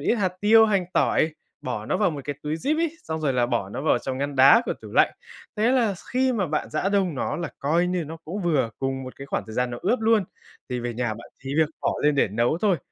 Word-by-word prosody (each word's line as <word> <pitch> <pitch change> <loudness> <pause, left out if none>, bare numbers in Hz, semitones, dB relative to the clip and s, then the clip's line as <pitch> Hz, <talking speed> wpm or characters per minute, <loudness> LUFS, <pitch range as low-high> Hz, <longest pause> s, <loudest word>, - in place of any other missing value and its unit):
ít - - +2
hạt 190 -5 0
tiêu, 220 +2 +6
hành 195 -4 +1
tỏi, 155 0 +2 0.3
bỏ 110 -4 -4
nó - - 0
vào 205 -5 +2
một 145 - -5
cái 145 - -3
túi 150 +1 -2
zip 285 - 0
ấy, 335 -1 -1
xong 160 0 -4
rồi 145 -3 +1
là 125 -1 +2
bỏ 115 -6 -1
nó 105 - -5
vào 155 - +3
trong 130 -1 -4
ngăn 140 0 -3
đá 135 - +7
của - - 0
tủ - - -9
lạnh. - - +4 0.4
Thế 220 +3 +3
là 230 -6 +2 0.2
khi 260 +1 +2
mà 205 -6 0
bạn 155 -1 -2
rã 155 +5 0
đông 195 -5 +1
nó 140 - -2
là 170 -1 -3
coi 165 +5 +1
như 180 -2 -1
nó 160 +2 -7
cũng 195 +6 -5
vừa 145 -9 +1
cùng 135 0 -2
một 130 0 -9
cái 140 - -9
khoảng - - -2
thời 110 - -9
gian 125 0 0
nó 120 - -5
ướp 245 - +1
luôn, 220 -2 +3 0.4
thì 125 -1 -3
về 120 -1 -4
nhà 120 0 -1
bạn 115 +2 -12
chỉ 135 +1 -4
việc 155 -1 +4
bỏ - - 0
lên 150 0 +3
để 140 - +2
nấu 120 - 0
thôi, 195 -3 +2
155 Hz, 275 wpm, -24 LUFS, 130-200 Hz, 0.4 s, đá